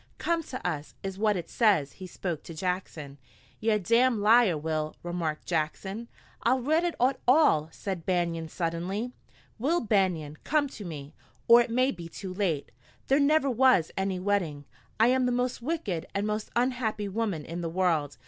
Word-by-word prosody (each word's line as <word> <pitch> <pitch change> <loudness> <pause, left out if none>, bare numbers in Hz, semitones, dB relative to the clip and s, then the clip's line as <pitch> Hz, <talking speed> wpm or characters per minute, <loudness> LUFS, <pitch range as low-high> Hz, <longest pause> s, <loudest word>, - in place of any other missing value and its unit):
"'Come 335 -1 0
to 255 -8 -5
us,'" 150 -4 -4
is 195 0 -5
what 210 -1 +2
it 170 - -5
says. 195 - +2
He 185 - -10
spoke 175 -3 -4
to 165 - -8
Jackson. 160 -5 -4 0.4
"Ye're 220 0 +2
a - - +1
damned 230 +5 +3
liar, 215 -5 +5
Will," 155 0 -2
remarked 170 -3 -3
Jackson. 190 +7 -2 0.3
"I'll 260 - +2
read 310 +7 +2
it 350 -1 -1 0.3
all!" 245 - +4
said 190 -2 -5
Banion 170 -2 -1
suddenly. 180 +9 -3 0.5
"'Will 310 +9 +2
Banion, 180 -9 0
come 295 -1 +2
to 220 - -9
me, 150 -5 -7 0.3
or 235 +1 +8
it 235 - -2
may 255 +3 +2
be 170 -3 -8
too 185 +2 -7
late. 180 -7 -1 0.4
There 275 +2 +4
never 295 0 +3
was 255 -9 +4
any 190 -1 -1
wedding. 180 -7 -1 0.3
I 225 +2 +6
am 255 0 +3
the - - +1
most 245 0 -1
wicked 235 - -3
and 200 +1 0
most 215 0 -2
unhappy 240 -4 0
woman 200 -6 -2
in 170 +2 -5
the 165 - -2
world. 160 -5 0
195 Hz, 175 wpm, -28 LUFS, 165-240 Hz, 0.5 s, or